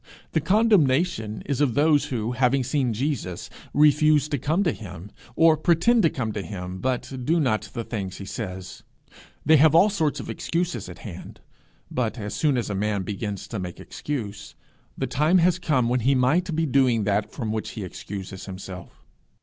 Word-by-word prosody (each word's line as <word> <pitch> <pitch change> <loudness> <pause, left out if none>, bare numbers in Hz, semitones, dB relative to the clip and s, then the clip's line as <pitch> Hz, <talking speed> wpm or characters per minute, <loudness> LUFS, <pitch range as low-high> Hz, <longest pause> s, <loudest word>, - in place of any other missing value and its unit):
The 160 - +1
condemnation 170 - +2
is 140 -1 -1
of 130 -6 +2
those 150 0 +4
who, 115 -2 -2
having 130 +1 +2
seen 130 -1 0
Jesus, 115 - -3 0.2
refuse 150 0 +4
to 145 -3 -1
come 160 +10 +1
to 165 - +2
him, 100 -3 -9 0.2
or 165 -1 +6
pretend 175 +9 +3
to 165 - +4
come 115 -7 -3
to 105 - -4
him 95 -2 -6
but 130 +2 -2
do 165 +6 +2
not 120 -8 0
the 115 - -3
things 100 -5 -5
he 100 - -7
says. 95 -4 -6 0.6
They 155 +1 +6
have 155 +2 +5
all 195 +5 +6
sorts 160 -7 0
of - - -7
excuses 175 +1 -2
at - - -9
hand; 95 -4 -9 0.5
but 125 -1 -1
as 105 -2 -5
soon 145 -4 +1
as 115 -3 -2
a - - -1
man 100 0 -1
begins 100 0 -4
to 110 - -4
make 90 -2 -6
excuse, 105 -8 -6 0.4
the - - -1
time 155 +7 +2
has 180 0 +3
come 135 -9 +1
when 125 +1 +1
he 135 +4 +2
might 155 +7 +2
be 160 +1 +1
doing 130 -5 +3
that 105 +1 0
from 115 -6 -4
which 110 0 -3
he 105 - -5
excuses 95 0 -7
himself. 95 -1 -9
125 Hz, 185 wpm, -24 LUFS, 105-155 Hz, 0.6 s, or